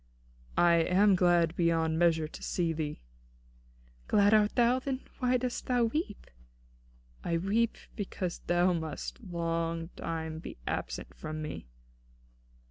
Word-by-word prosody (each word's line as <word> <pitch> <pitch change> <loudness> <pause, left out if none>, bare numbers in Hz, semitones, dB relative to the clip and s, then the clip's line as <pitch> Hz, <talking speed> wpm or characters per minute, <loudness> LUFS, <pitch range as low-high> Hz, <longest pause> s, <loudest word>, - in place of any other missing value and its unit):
"I 170 -1 +5
am 190 +5 +4
glad 175 -2 +3
beyond 165 -2 +2
measure 165 -2 +3
to - - -11
see 170 -2 0
thee." 150 - -4 1.0
"Glad 205 0 +4
art 210 -1 +4
thou? 245 +1 +4
Then 265 0 -3 0.2
why 250 -1 +3
dost 250 0 -3
thou 245 -2 +3
weep?" 230 - -2 1.0
"I 170 -1 0
weep 215 +6 +1 0.2
because 190 -4 -4
thou 175 +1 +3
must 160 - -4
be 220 - -12
long 165 -1 -1
time 160 -2 -5 0.2
absent - - -4
from 155 0 -6
me." 150 - -6
175 Hz, 125 wpm, -30 LUFS, 165-210 Hz, 1.0 s, I